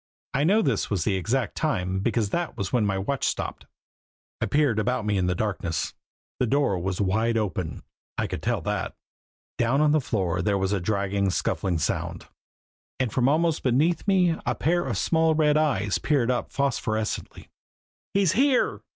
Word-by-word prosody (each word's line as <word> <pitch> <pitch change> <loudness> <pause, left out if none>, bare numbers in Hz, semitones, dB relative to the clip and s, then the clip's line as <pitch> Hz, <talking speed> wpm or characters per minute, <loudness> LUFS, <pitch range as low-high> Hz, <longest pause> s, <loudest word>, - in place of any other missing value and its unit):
I 140 - +1
know 210 +6 +4
this 130 -8 0
was 95 -6 0
the 100 - +1
exact 115 +7 -1
time 95 - -1
because 110 0 0
that 175 -1 -2
was 95 -1 -3
when 115 -4 +3
my 100 -1 0
watch 115 +8 -2
stopped. - - -2 0.7
I - - +1
peered 145 -7 +2
about 120 0 0
me 105 -1 +1
in 95 -2 +1
the 90 - +1
darkness. 90 -6 -2 0.5
The 125 - +2
door 135 -7 +1
was 90 +1 -3
wide 110 +4 +1
open 95 -8 -3 0.3
I - - 0
could - - -4
tell - - 0
that. - - -3 0.6
Down 120 +3 +2
on 150 -1 +4
the 155 0 +3
floor 95 -8 -1
there 100 +2 +1
was 95 +1 0
a 100 - +1
dragging, 100 0 0
scuffling 90 -1 -1
sound, 80 - -2 0.7
and 130 -4 -1
from 130 0 +3
almost 160 +1 +2
beneath 155 +9 +1
me 180 -4 +3
a - - -1
pair 175 -2 +1
of 115 -7 -2
small 160 - +2
red 150 -1 +3
eyes 105 -11 +1
peered 130 -5 +1
up 125 - -2
phosphorescently. 110 -6 -2 0.7
"He's 195 -5 +4
here!" 265 +1 +2
115 Hz, 175 wpm, -25 LUFS, 95-150 Hz, 0.7 s, know